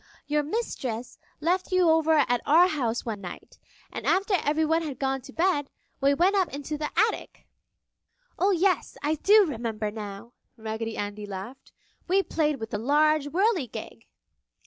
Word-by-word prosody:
"Your 295 0 +1
Mistress 265 - -4 0.2
left 360 +5 0
you 370 -1 +4
over 320 0 +4
at 245 -1 +1
our 335 +5 +6
house 245 -9 -2
one 215 -4 -4
night, 175 -2 -10 0.3
and - - -5
after 390 +2 +2
everyone 315 +2 +2
had 295 -5 -5
gone 270 -1 -1
to 270 - -12
bed, 325 -3 +1 0.3
we 280 +1 +4
went 365 +6 +3
up 380 -3 +1
into 285 +2 -5
the 300 0 -3
attic!" 440 +1 -1 0.9
"Oh, 385 - +3
yes! 370 -3 +1
I 300 +2 +1
do 410 +7 +5
remember 225 -7 -3
now!" 210 +2 -8 0.2
Raggedy 220 0 -4
Andy 205 0 -4
laughed. 205 +7 -8 0.4
"We 385 +2 +3
played 305 -4 0
with 225 0 -6
the 210 - -2
large 295 +4 +3
whirligig!" 350 - -1
295 Hz, 155 wpm, -26 LUFS, 230-345 Hz, 0.9 s, our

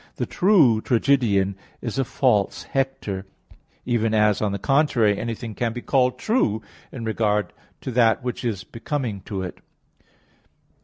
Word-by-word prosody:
ii, - - -26
10): - - -28
"The - - -2
true 160 - +4
tragedian 115 -7 +2 0.2
is 115 +3 -4
a - - +3
false 120 -6 +1
Hector": 120 -8 -3 0.6
even 115 -2 +1
as, 105 -1 +3
on 105 -2 +1
the 100 - -2
contrary, 125 -3 +2
anything 115 -1 -4
can 115 +1 -2
be 120 - -5
called 125 -2 +2
true, 115 - 0 0.3
in 115 -3 -6
regard 105 -2 0 0.3
to 130 - -4
that 115 -2 +3
which 125 0 -4
is 110 -6 -2
becoming 115 -4 -4
to 95 -2 -4
it. 90 - -7
115 Hz, 155 wpm, -23 LUFS, 105-130 Hz, 0.6 s, true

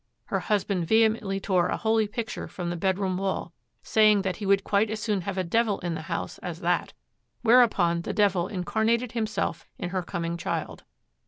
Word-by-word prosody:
Her - - -1
husband 200 -5 0
vehemently 220 -2 +2
tore 185 -3 +1
a - - -1
holy 220 -1 +2
picture 230 +1 -5
from 175 -2 -4
the - - -3
bedroom 190 +1 0
wall, 190 -3 -2 0.3
saying 215 -2 +4
that 185 -2 -2
he 205 - -4
would 195 0 +4
quite 205 +2 +2
as 220 0 -3
soon 210 -3 -1
have 190 +2 -4
a 185 - +1
devil 215 +3 +1
in 175 -1 -2
the 160 - -4
house - - -4
as - - -6
that; - - 0 0.5
whereupon 220 -8 +4
the - - -4
devil 190 -4 +2
incarnated 220 +5 0
himself 220 -7 -2
in 175 - -4
her 185 0 -1
coming 170 -1 -3
child. - - -4
200 Hz, 185 wpm, -26 LUFS, 180-220 Hz, 0.5 s, saying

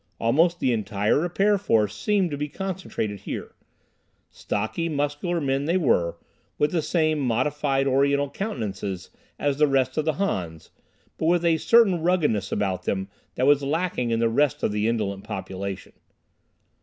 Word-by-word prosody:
Almost 165 +9 +2
the 125 - +2
entire 105 +1 +1
repair 195 +5 +2
force 110 - +1
seemed 195 - +1
to - - -2
be 150 +1 -3
concentrated 185 - -4
here. - - -6 0.8
Stocky, 110 +11 -2
muscular 145 +4 -1
men 135 -1 0
they 170 +4 +2
were, 85 - +1 0.4
with 150 0 +2
the 170 - +1
same 155 -1 +1
modified 135 +2 0
Oriental 140 +1 +2
countenances 105 - -4 0.3
as 145 -1 -1
the 150 - +5
rest 130 -2 +1
of 155 - +1
the 155 - +1
Hans, 85 - -3 0.5
but 160 - 0
with 175 0 +2
a 165 -1 +4
certain 200 -2 +4
ruggedness 155 - +1
about 95 -3 -1
them 95 0 -2 0.3
that 130 - +1
was 145 0 +5
lacking 145 -3 -1
in 115 - +1
the 115 - +3
rest 135 +5 +1
of - - +1
the 105 +1 0
indolent 100 -4 -1
population. 95 0 -6
140 Hz, 155 wpm, -25 LUFS, 110-165 Hz, 0.8 s, the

